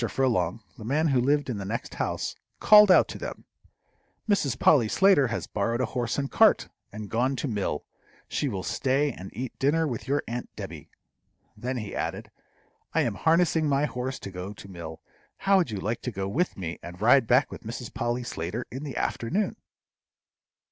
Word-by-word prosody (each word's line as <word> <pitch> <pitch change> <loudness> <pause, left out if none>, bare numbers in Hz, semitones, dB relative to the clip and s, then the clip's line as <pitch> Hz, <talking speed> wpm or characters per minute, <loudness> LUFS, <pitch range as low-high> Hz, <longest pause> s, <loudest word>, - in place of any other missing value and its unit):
Furlong, 115 -5 0 0.2
the - - -8
man 150 +7 +1
who 130 -3 +3
lived 145 +3 +2
in 120 -5 -3
the - - -4
next 110 +5 -4
house, - - -2 0.2
called 210 -1 +8
out 185 - +7
to - - -7
them, - - -7 0.8
"Mrs. 145 - +1
Polly 125 -6 +5
Slater 190 - +4
has 115 - -3
borrowed 115 +3 -1
a 130 - +2
horse 120 0 -2
and 140 -1 -2
cart, - - +4 0.2
and 105 0 -7
gone 125 +6 0
to 140 - -3
mill; 100 - -2 0.4
she 145 - -1
will 100 -7 -3
stay 140 +2 +1
and 95 -5 -9
eat 125 0 -6
dinner 155 +4 +2
with 125 -1 -5
your 140 +2 +1
aunt 120 +1 -4
Debby." - - -8 0.7
Then 125 +1 -3
he 105 -4 -5
added, - - -4 0.6
"I - - +4
am - - 0
harnessing 165 -1 +2
my 140 +1 +2
horse 130 -1 -3
to 100 - -7
go 90 +2 -6
to 100 - -12
mill; 85 -4 -8 0.4
how 195 0 +3
would 175 -8 +2
you 105 - -4
like 110 +5 -2
to 125 - -3
go 95 -2 -3
with 165 - -1
me, 85 -3 -5
and 90 +1 -9
ride 120 +3 +5
back 125 +3 +3
with - - -8
Mrs. 115 +1 -7
Polly 120 +1 -1
Slater 110 +1 -4
in 130 +4 -6
the 140 -3 -5
afternoon?" 185 - -1
125 Hz, 190 wpm, -27 LUFS, 105-145 Hz, 0.8 s, called